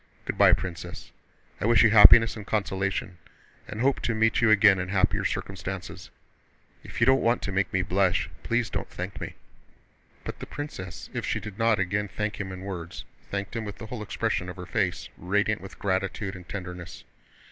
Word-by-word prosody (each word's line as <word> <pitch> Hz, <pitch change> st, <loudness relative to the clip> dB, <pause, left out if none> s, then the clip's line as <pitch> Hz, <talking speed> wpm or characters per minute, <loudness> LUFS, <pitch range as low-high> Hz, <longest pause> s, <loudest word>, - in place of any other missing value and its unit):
Good -, -, -3 dB
by, -, -, +7 dB
Princess. 90 Hz, -3 st, -5 dB, 0.5 s
I -, -, 0 dB
wish 120 Hz, 0 st, +6 dB
you 110 Hz, -, +5 dB
happiness 115 Hz, +1 st, +8 dB
and 110 Hz, -, -7 dB
consolation 95 Hz, -3 st, -2 dB, 0.5 s
and 110 Hz, -, -7 dB
hope 135 Hz, +1 st, +2 dB
to 115 Hz, -, -1 dB
meet 115 Hz, +1 st, +2 dB
you 115 Hz, -, +4 dB
again 105 Hz, -2 st, +6 dB
in 95 Hz, 0 st, -3 dB
happier 95 Hz, -1 st, +1 dB
circumstances. 95 Hz, -1 st, -5 dB, 0.7 s
If -, -, -8 dB
you 115 Hz, -, +5 dB
don't 135 Hz, +1 st, +5 dB
want 115 Hz, +1 st, +1 dB
to 100 Hz, -, -2 dB
make 95 Hz, -1 st, 0 dB
me 95 Hz, 0 st, +1 dB
blush, 90 Hz, 0 st, +1 dB
please 120 Hz, -2 st, -1 dB
don't -, -, -4 dB
thank -, -, -6 dB
me!" -, -, -6 dB, 0.9 s
But -, -, -6 dB
the -, -, -7 dB
princess, 95 Hz, -, -7 dB
if -, -, -3 dB
she -, -, -1 dB
did 105 Hz, 0 st, -9 dB
not 115 Hz, -1 st, +3 dB
again 100 Hz, +2 st, -1 dB
thank 105 Hz, +1 st, -3 dB
him 95 Hz, -1 st, -5 dB
in 95 Hz, 0 st, -7 dB
words, 90 Hz, -3 st, -6 dB, 0.2 s
thanked 100 Hz, +2 st, -4 dB
him 115 Hz, -, -2 dB
with 105 Hz, -1 st, -7 dB
the -, -, -8 dB
whole 110 Hz, 0 st, -6 dB
expression 90 Hz, -3 st, -2 dB
of 90 Hz, -, -7 dB
her 90 Hz, -2 st, -8 dB
face, 90 Hz, -5 st, -1 dB
radiant 105 Hz, +4 st, 0 dB
with 95 Hz, 0 st, -11 dB
gratitude 95 Hz, +1 st, -2 dB
and 90 Hz, -1 st, -12 dB
tenderness. 90 Hz, -3 st, -7 dB
100 Hz, 190 wpm, -27 LUFS, 95-110 Hz, 0.9 s, happiness